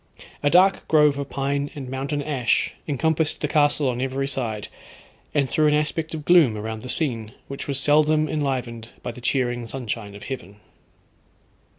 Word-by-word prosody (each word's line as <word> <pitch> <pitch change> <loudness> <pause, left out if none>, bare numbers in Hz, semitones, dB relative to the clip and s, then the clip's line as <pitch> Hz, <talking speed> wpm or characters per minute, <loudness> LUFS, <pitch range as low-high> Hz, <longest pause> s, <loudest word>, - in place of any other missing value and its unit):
A 145 - +3
dark 185 +4 +4
grove 150 -2 +4
of 140 - -4
pine 140 +1 -1
and 135 -3 -6
mountain 135 +3 -3
ash 135 -5 0
encompassed 155 +2 +1
the 150 - -1
castle 145 -1 +3
on 125 -1 -1
every 135 +1 -1
side, 115 -6 -3 0.7
and 140 -2 +3
threw 155 +3 +2
an 150 - +4
aspect 155 +2 -1
of 150 -2 -7
gloom 160 -11 +5
around 110 +1 -5
the 125 - -8
scene, 115 -8 -2
which 140 - -6
was 140 -1 0
seldom 155 +2 +4
enlivened 125 -6 -2
by 120 - -3
the 125 - -12
cheering 120 -1 0
sunshine 115 -4 -5
of 100 - -10
heaven. 105 -6 -7
140 Hz, 170 wpm, -23 LUFS, 120-150 Hz, 0.7 s, gloom